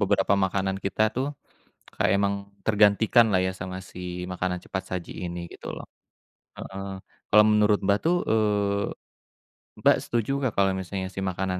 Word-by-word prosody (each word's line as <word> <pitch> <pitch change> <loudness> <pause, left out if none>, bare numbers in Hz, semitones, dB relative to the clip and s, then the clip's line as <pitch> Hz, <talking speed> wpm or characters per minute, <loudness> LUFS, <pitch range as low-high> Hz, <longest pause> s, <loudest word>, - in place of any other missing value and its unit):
beberapa 100 -1 +2
makanan 95 0 -1
kita 100 +2 0
tuh, 130 +2 0 0.7
kayak - - +2
emang 100 0 +1 0.3
tergantikan 110 +2 +5
lah 95 - +3
ya, 95 - 0
sama 95 +1 -5
si 90 0 -6
makanan 90 0 -2
cepat 95 - -4
saji 85 - -9
ini, 85 0 -5
gitu - - -10
loh. - - -8 0.7
Heeh, 95 0 -6 0.5
kalau 105 0 +8
menurut 105 -1 +4
Mbak 100 +1 +4
tuh, 170 +2 +3
eee, 105 -2 +1 1.0
Mbak - - +6
setuju 120 +2 -1
nggak 130 -5 -1
kalau 100 -1 +4
misalnya 95 +1 -4
si - - -3
makanan 95 -1 -2
100 Hz, 155 wpm, -26 LUFS, 95-105 Hz, 1.0 s, kalau